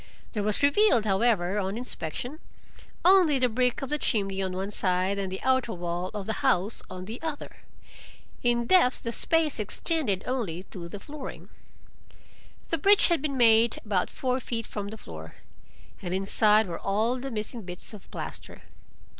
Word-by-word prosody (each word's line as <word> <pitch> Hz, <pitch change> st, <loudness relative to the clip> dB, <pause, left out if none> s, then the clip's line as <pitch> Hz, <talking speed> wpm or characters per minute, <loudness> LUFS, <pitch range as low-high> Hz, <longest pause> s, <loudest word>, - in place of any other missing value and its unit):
There 210 Hz, -, -2 dB
was 210 Hz, +5 st, +1 dB
revealed, 285 Hz, -, +4 dB
however, 200 Hz, -2 st, +2 dB
on 195 Hz, +2 st, -2 dB
inspection, 245 Hz, -, -5 dB, 0.7 s
only 360 Hz, -6 st, +6 dB
the 255 Hz, -1 st, +3 dB
brick 250 Hz, +2 st, 0 dB
of 270 Hz, -, -5 dB
the 300 Hz, -, 0 dB
chimney 195 Hz, -6 st, 0 dB
on 190 Hz, -1 st, -2 dB
one 190 Hz, +2 st, -4 dB
side 185 Hz, 0 st, 0 dB
and 190 Hz, -1 st, -3 dB
the 190 Hz, -, -6 dB
outer 260 Hz, -3 st, +1 dB
wall 175 Hz, +1 st, -3 dB
of 205 Hz, -2 st, -4 dB
the 220 Hz, -, -1 dB
house 195 Hz, +5 st, +2 dB
on 185 Hz, 0 st, -7 dB
the 225 Hz, +5 st, -7 dB
other; 315 Hz, -3 st, -5 dB, 0.8 s
in 240 Hz, -1 st, +1 dB
depth 300 Hz, -5 st, +4 dB
the 230 Hz, -, -2 dB
space 320 Hz, +1 st, +1 dB
extended 215 Hz, -, +1 dB
only 210 Hz, -10 st, -3 dB
to 170 Hz, -2 st, -7 dB
the 205 Hz, -, -7 dB
flooring. 290 Hz, +4 st, -9 dB, 1.2 s
The 330 Hz, -, 0 dB
breach 400 Hz, +5 st, +6 dB
had 340 Hz, -2 st, +2 dB
been 280 Hz, -3 st, -2 dB
made 230 Hz, -1 st, +5 dB
about 200 Hz, -4 st, 0 dB
four 255 Hz, 0 st, -1 dB
feet 230 Hz, -2 st, -4 dB
from 205 Hz, -1 st, -5 dB
the 220 Hz, +2 st, -7 dB
floor, 80 Hz, -, -10 dB, 0.7 s
and 180 Hz, -1 st, -3 dB
inside 210 Hz, +3 st, +3 dB
were 170 Hz, -3 st, -6 dB
all 220 Hz, +6 st, 0 dB
the 270 Hz, +2 st, -5 dB
missing 225 Hz, 0 st, -4 dB
bits 180 Hz, +2 st, -7 dB
of 205 Hz, -, -12 dB
plaster. -, -, -7 dB
220 Hz, 170 wpm, -27 LUFS, 190-260 Hz, 1.2 s, only